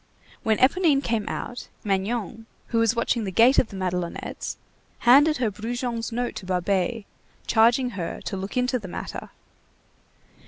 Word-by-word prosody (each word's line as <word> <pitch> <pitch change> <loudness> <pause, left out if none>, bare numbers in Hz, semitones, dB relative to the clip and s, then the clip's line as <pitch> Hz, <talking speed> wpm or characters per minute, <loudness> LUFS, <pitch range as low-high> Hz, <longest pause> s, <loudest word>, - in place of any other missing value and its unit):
When 220 -1 +2
Éponine 285 0 +3
came 225 -4 -1
out, 245 - -5 0.2
Magnon, 220 +2 -2 0.2
who 230 - +1
was 230 +1 +3
watching 235 0 0
the 200 - -2
gate 230 +7 +5
of - - +2
the 200 - -9
Madelonettes, 180 -2 -3 0.4
handed 290 +6 +6
her 235 -4 0
Brujon's 235 +2 -3
note 245 +1 -2
to - - -7
Babet, 190 +4 0 0.4
charging 240 +3 +3
her 175 -7 -4
to - - -4
look 195 +4 -5
into 250 0 +1
the 200 - -8
matter. 175 - -6
230 Hz, 150 wpm, -25 LUFS, 195-245 Hz, 0.4 s, handed